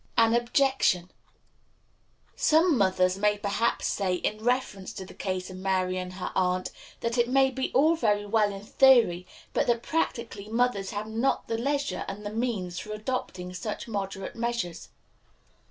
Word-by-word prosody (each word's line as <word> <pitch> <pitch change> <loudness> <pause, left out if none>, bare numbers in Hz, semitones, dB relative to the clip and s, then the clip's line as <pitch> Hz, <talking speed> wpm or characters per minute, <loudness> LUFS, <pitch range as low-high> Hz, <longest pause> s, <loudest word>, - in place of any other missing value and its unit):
An 225 0 +5
Objection. 240 -7 +2 1.2
Some 320 +1 +4
mother 190 -4 +3
may 210 0 +2
perhaps 205 +3 0
say, 190 -3 0
in 215 +4 -3
reference 245 -6 -1
to 190 - -7
the - - -12
case 185 -1 -4
of 185 - -8
Mary 185 -1 0
and 180 0 -6
her 185 0 -5
aunt, 185 0 0 0.3
that 235 +1 -1
it 240 0 +3
may 265 +1 +4
be 265 0 -3
all 310 +6 +5
very 210 -9 +1
well 210 0 +2
in 195 0 -8
theory, 225 -7 +4 0.3
but - - +1
that 235 -1 +1
practically 230 -9 -2
mothers 225 -4 +1
have 205 +1 -4
not 225 +5 0
the 225 - -1
leisure 280 +3 -1
and 205 +2 -6
the 205 - -4
means 210 -7 -2
for 215 - -6
adopting 210 -5 -4
such 210 +5 -5
moderate 195 -3 -4
measures. 235 -8 -3
215 Hz, 160 wpm, -27 LUFS, 190-240 Hz, 1.2 s, An